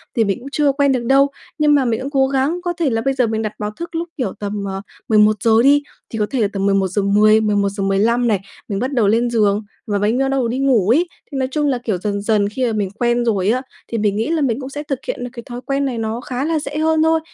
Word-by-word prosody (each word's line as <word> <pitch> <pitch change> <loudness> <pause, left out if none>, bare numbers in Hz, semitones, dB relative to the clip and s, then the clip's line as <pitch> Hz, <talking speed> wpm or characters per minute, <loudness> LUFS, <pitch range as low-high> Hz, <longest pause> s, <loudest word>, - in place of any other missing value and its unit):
thì 230 - +3
mình 200 +1 -1
cũng 255 - -10
chưa 295 -1 +2
quen 280 0 +2
được 255 -2 0
đâu. 275 +3 +5 0.3
Nhưng 300 -2 +4
mà 270 -3 +2
mình 230 0 0
cũng 270 - -4
cố 270 -1 +3
gắng 275 +6 0
có 350 -1 -1
thể 330 -5 +1
là 225 -2 0
bây 270 +3 0
giờ 255 -3 +1
mình 220 0 -1
đặt 215 -1 -3
báo 210 -1 -3
thức 340 +9 -8
lúc, 335 +1 -3
kiểu, 245 -9 -2
tầm, 205 -1 -4
à, 195 0 -4 0.3
11:00 215 0 +4
đi, 285 +2 +5 0.3
thì 225 - -5
có 210 - +2
thể 260 -4 0
là 210 - +3
tầm 195 -1 -1
11:10-11:15 200 +2 +2
này, 210 -4 +2 0.3
mình 200 -2 -2
bắt 260 +5 -2
đầu 235 -6 +2
lên 230 +4 +2
giường 210 -2 +2 0.2
và 205 -1 0
bánh 215 +4 +1
bắt 270 - +2
đầu 270 -3 +1
đi 245 +3 -2
ngủ 250 -8 +2
ấy, 320 +10 +3 0.2
thì 275 - -4
nói 260 -1 0
chung 295 +1 0
là, 265 -3 +1
kiểu, 215 -6 -1
dần 200 +1 -3
dần 205 -1 +1
khi 255 +4 -2
mà 230 - 0
mình 205 -3 -1
quen 240 +2 0
rồi 205 -4 +1
á, 255 +3 +1 0.3
thì 230 - -3
mình 210 -2 +1
nghĩ 220 +2 -1
là 325 -1 0
mình 255 -3 0
cũng 260 -1 -6
sẽ 290 +2 -6
thực 275 -3 -3
hiện 245 - -3
được 245 - -4
cái 235 -2 -8
thói 245 0 -7
quen 275 0 0
này 250 -3 -2
nó 225 +1 -3
khá 255 +2 -3
là 320 0 0
dễ 295 0 -5
hơn 315 0 +2
thôi. 320 0 +3
235 Hz, 275 wpm, -19 LUFS, 210-275 Hz, 0.3 s, đâu